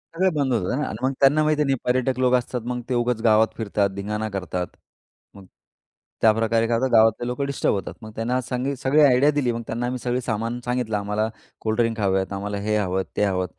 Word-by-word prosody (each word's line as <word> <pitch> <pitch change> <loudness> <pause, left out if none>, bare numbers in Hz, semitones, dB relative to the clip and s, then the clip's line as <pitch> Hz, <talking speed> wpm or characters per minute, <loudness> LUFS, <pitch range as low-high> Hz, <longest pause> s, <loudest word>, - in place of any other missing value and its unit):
सगळं 185 +1 +2
बंद 140 -4 0
होतं 115 +4 0
ना 150 - -1
आणि 110 - -5
मग 130 - +2
त्यांना 145 +3 +5
माहिती 150 0 +2
नाही, 135 -1 +1
पर्यटक 130 +1 0
लोक 125 -1 +3
असतात, 125 0 -2
मग 125 0 -3
ते - - 0
उगाच 120 -1 0
गावात 110 0 +5
फिरतात, 100 -2 0
धिंगाणा 105 +2 -3
करतात. 90 -3 -3 0.7
मग 100 -1 -13 0.8
त्याप्रकारे 115 +1 +3
काय 115 -1 +1
होतं, 130 +1 0
गावातले 110 +1 +4
लोकं 125 +3 -2
डिस्टर्ब 140 0 0
होतात. 95 -3 -4
मग 110 - -9
त्यांनी 125 +3 -2
सगळी 145 +4 +3
आयडिया 140 +2 +5
दिली. 140 -5 0
मग 115 - -4
त्यांना 120 +2 -2
आम्ही 125 0 -3
सगळं 125 +1 -1
सामान 115 +2 -2
सांगितलं, 125 -3 -1
आम्हाला 105 +2 -1 0.3
कोल्ड 110 0 -1
ड्रिंक 115 -1 0
हवे 95 -2 +2
आहेत, 95 +1 -4
आम्हाला 100 +1 -3
हे 105 0 +2
हवं, 95 -2 0
ते 105 - +2
हवं 95 -2 0
115 Hz, 210 wpm, -23 LUFS, 105-130 Hz, 0.8 s, त्यांना